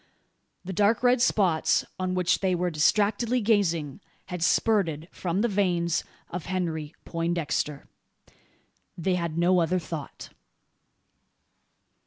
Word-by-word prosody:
The 190 - -4
dark 210 +5 +2
red 245 0 +4
spots 185 -9 +2
on 185 0 -1
which 180 -2 +2
they 185 -2 +1
were 175 0 -1
distractedly 210 +9 +2
gazing 190 - 0 0.2
had 180 -2 -6
spurted 170 -4 +1
from 180 +2 -2
the 235 - +2
veins 180 -5 0 0.3
of 170 -2 -5
Henry 165 -4 -3
Poindexter. 165 -4 -2 1.1
They 180 +2 0
had 170 -3 -2
no 180 +2 +4
other 170 +3 +1
thought. 160 -4 -7
180 Hz, 115 wpm, -26 LUFS, 165-200 Hz, 1.1 s, red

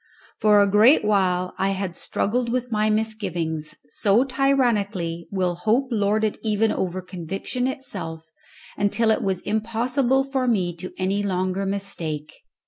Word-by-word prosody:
For 210 -1 +5
a 200 - +5
great 210 +6 +5
while 185 -3 +1
I 195 - +2
had 190 -3 -3
struggled 235 +7 -1
with 250 0 -2
my 215 0 +2
misgivings, 185 -8 -2
so 210 +8 +3
tyrannically 220 -11 0
will 185 -3 0
hope 220 +9 +1
lord 215 -1 +1
it 215 - -1
even 215 0 +1
over 185 0 -2
conviction 190 +8 -3
itself, 165 -12 -6 0.4
until 220 +2 +2
it - - +1
was 190 -2 -1
impossible 240 +5 +1
for 270 -2 -1
me 185 -7 +1
to 185 +2 -7
any 190 +2 0
longer 185 0 -1
mistake. 165 -6 -4
205 Hz, 140 wpm, -23 LUFS, 185-230 Hz, 0.4 s, For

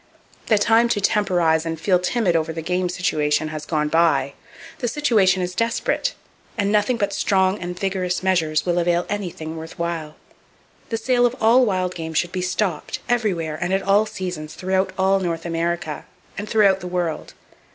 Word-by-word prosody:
The 220 - +4
time 230 +3 +4
to 220 - +1
temporize 180 -6 +2
and 165 -1 -4
feel 180 +1 +2
timid 180 -1 0
over 160 0 0
the 160 0 -5
game 180 +1 0
situation 155 -4 0
has 155 -1 -6
gone 150 -2 0
by. 160 -4 +2 0.5
The 245 - -1
situation 215 -9 +2
is 180 0 -3
desperate; 230 - -1 0.4
and 200 -1 +1
nothing 210 +3 +2
but 200 -3 -1
strong 190 0 +1
and 180 0 -6
vigorous 185 -2 -1
measures 165 -5 +1
will 175 -1 +1
avail 175 0 +1
anything 170 -6 -4
worth 160 0 -9
while. 165 -3 -3 0.7
The 225 - -1
sale 245 +1 +3
of 240 - -5
all 240 +2 +5
wild 185 -2 0
game 160 -2 -6
should 175 +2 +1
be 185 - -3
stopped, 180 -2 -2
everywhere 180 -10 -1
and 175 +2 -1
at 195 - -1
all 200 +3 +3
seasons, 180 -7 -6
throughout 190 +1 0
all 190 +1 +3
North 170 -3 -3
America, 165 -2 -2 0.3
and 205 +1 -6
throughout 200 -4 +4
the 180 - -7
world. 175 -3 -3
180 Hz, 175 wpm, -22 LUFS, 165-205 Hz, 0.7 s, all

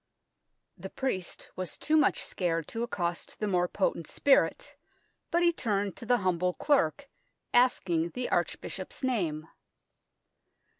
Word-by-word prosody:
The - - -7
priest 195 -10 -3
was 185 -2 -5
too 310 - +1
much 305 -2 +3
scared 165 -4 -1
to 230 - -4
accost 175 -8 -3
the 210 - -1
more 180 -2 +2
potent 175 -4 -1
spirit, 280 - +2 0.5
but 345 +1 +2
he 340 0 +4
turned 205 - -1
to 230 - -8
the 245 0 +4
humble 180 0 +1
clerk, 280 - +1 0.5
asking 180 -9 +3
the 250 0 -2
archbishop's - - -2
name. 170 -12 -1
200 Hz, 130 wpm, -29 LUFS, 175-255 Hz, 0.5 s, he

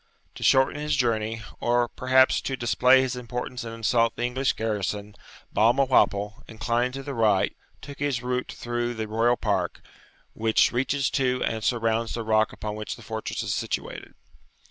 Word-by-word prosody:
To - - -12
shorten 135 +2 +3
his 150 0 0
journey, 115 -2 0 0.2
or 120 0 +2
perhaps 130 +2 +3
to 135 - -3
display 125 +2 +4
his 130 -1 -2
importance 125 0 -5
and 115 -1 -6
insult 115 0 +1
the - - -3
English 130 +2 0
garrison, 105 -1 -3 0.4
Balmawhapple, 110 -3 +2
inclining 115 +2 -1
to 135 0 -6
the 140 0 -5
right, 110 -5 +2 0.3
took 140 0 -9
his 140 -4 -1
route 125 0 -2
through 120 0 -3
the 110 -1 -4
royal 115 +3 +2
park, - - -1 0.5
which 110 0 +2
reaches 135 +3 0
to 125 -2 +1
and 110 -1 -2
surrounds 115 -1 0
the 115 - -3
rock 110 0 +2
upon 105 -1 -5
which 105 0 -5
the - - -14
fortress 110 -1 -4
is - - -2
situated. - - -4
120 Hz, 165 wpm, -25 LUFS, 110-130 Hz, 0.5 s, display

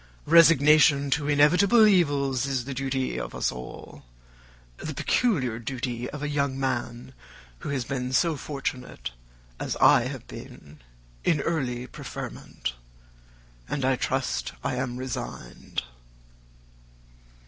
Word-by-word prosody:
Resignation 150 -3 +6
to 145 +1 +1
inevitable 180 +10 +5
evils 140 - +2
is 130 -3 -1
the 140 - -4
duty 130 0 -2
of - - -6
us - - 0
all: 60 0 -10 0.7
the 155 - -6
peculiar 130 - +1
duty 125 0 -4
of 150 0 -7
a - - -1
young 140 -2 -1
man 120 -1 -3 0.5
who - - -6
has 135 -4 -1
been 125 -1 -3
so 165 +4 +2
fortunate 135 - -5 0.5
as - - -2
I - - +5
have - - -7
been, 75 +1 -11 0.4
in 155 - +2
early 125 -7 -2
preferment; 60 - -6 1.0
and, 140 -3 -1
I 130 0 +3
trust, 60 - -2
I - - -1
am 125 -1 -3
resigned. 125 - -5
135 Hz, 120 wpm, -26 LUFS, 125-150 Hz, 1.0 s, Resignation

